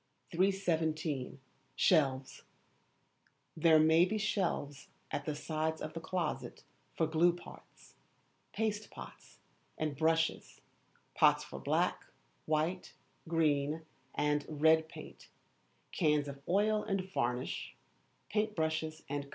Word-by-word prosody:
317. 160 -7 0 0.4
Shelves. 135 -6 +2 1.1
There 160 0 +5
may 160 +2 +6
be 190 +4 0
shelves 175 -9 -1 0.2
at - - -3
the 150 - -2
sides 160 +1 -2
of 155 - -5
the 165 - -4
closet 180 +1 -3 0.3
for 160 - +3
glue 165 +2 +3
pots, 175 - -14 0.6
paste 215 -1 -2
pots - - -12 0.4
and 155 -2 -2
brushes, 160 +2 0 0.5
pots - - +4
for - - -8
black, - - 0 0.4
white, 155 +4 -1 0.3
green, 155 -1 +1 0.3
and 150 0 +1
red 160 +1 +3
paint, - - -11 0.6
cans 150 -4 +2
of 140 -1 -7
oil 210 +3 +3
and 195 -2 -1
varnish, 125 -2 -2 0.5
paint 215 0 0
brushes, 160 0 -2
&c. 145 0 -3
160 Hz, 110 wpm, -33 LUFS, 150-175 Hz, 1.1 s, may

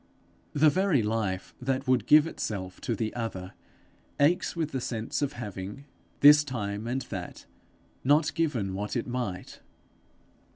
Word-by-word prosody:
The 150 +1 +5
very 185 - +2
life 105 -4 -2
that 130 +1 -1
would 125 -4 +2
give 150 0 +7
itself 95 - -5
to 115 - -1
the 110 +1 -2
other, 95 -6 -5 0.7
aches 170 +7 +2
with 160 -2 -2
the 130 - -2
sense 115 +1 -3
of 145 0 0
having, 105 +1 -7 0.4
this 150 +1 +9
time 105 -5 -4
and 130 +2 -1
that, 95 -7 -7 0.6
not 150 +3 +3
given 125 - -1
what 105 +5 -4
it 120 - -1
might. 120 -7 -4
120 Hz, 140 wpm, -28 LUFS, 105-145 Hz, 0.7 s, this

